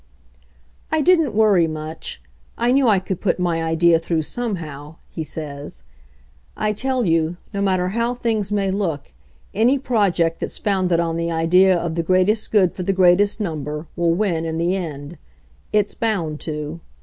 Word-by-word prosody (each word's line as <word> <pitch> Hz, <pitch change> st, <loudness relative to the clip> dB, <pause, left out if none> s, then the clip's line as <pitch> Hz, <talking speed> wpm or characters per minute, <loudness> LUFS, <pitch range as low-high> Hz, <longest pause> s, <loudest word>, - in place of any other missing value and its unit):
"I 315 Hz, -, +2 dB
didn't 320 Hz, -, +3 dB
worry 205 Hz, -6 st, +4 dB
much. 155 Hz, -, -6 dB, 0.3 s
I 240 Hz, +1 st, +2 dB
knew 270 Hz, 0 st, +3 dB
I 210 Hz, -3 st, +5 dB
could 185 Hz, -1 st, -4 dB
put 195 Hz, -, +1 dB
my; 170 Hz, -2 st, 0 dB
idea 165 Hz, +1 st, +3 dB
through 165 Hz, -1 st, -1 dB
somehow," 160 Hz, -9 st, -5 dB, 0.2 s
he 160 Hz, -, -4 dB
says. 145 Hz, -2 st, -6 dB, 0.7 s
"I 215 Hz, 0 st, 0 dB
tell 255 Hz, +2 st, -1 dB
you, 165 Hz, 0 st, +1 dB, 0.2 s
no 200 Hz, -, -2 dB
matter 185 Hz, -2 st, +1 dB
how 235 Hz, +4 st, -1 dB
things 220 Hz, -4 st, -1 dB
may 200 Hz, -2 st, 0 dB
look, 180 Hz, -7 st, -3 dB, 0.4 s
any 240 Hz, +7 st, +3 dB
project 200 Hz, -10 st, +1 dB
that's: -, -, -4 dB
founded 185 Hz, -4 st, +1 dB
on 165 Hz, -1 st, -1 dB
the 170 Hz, 0 st, -1 dB
idea 180 Hz, +3 st, +4 dB
of 170 Hz, -1 st, -3 dB
the 170 Hz, -, 0 dB
greatest 185 Hz, +5 st, +1 dB
good 190 Hz, -5 st, +3 dB
for -, -, -6 dB
the 195 Hz, +2 st, 0 dB
greatest 190 Hz, +3 st, +4 dB
number 150 Hz, -5 st, -4 dB
will 170 Hz, -1 st, +1 dB
win 175 Hz, -5 st, 0 dB
in 160 Hz, 0 st, -3 dB
the 170 Hz, +3 st, +1 dB
end. 155 Hz, -3 st, -6 dB, 0.5 s
It's 210 Hz, -1 st, +1 dB
bound 200 Hz, -9 st, -1 dB
i -, -, -7 dB
to." 150 Hz, +1 st, -5 dB
180 Hz, 170 wpm, -21 LUFS, 165-210 Hz, 0.7 s, I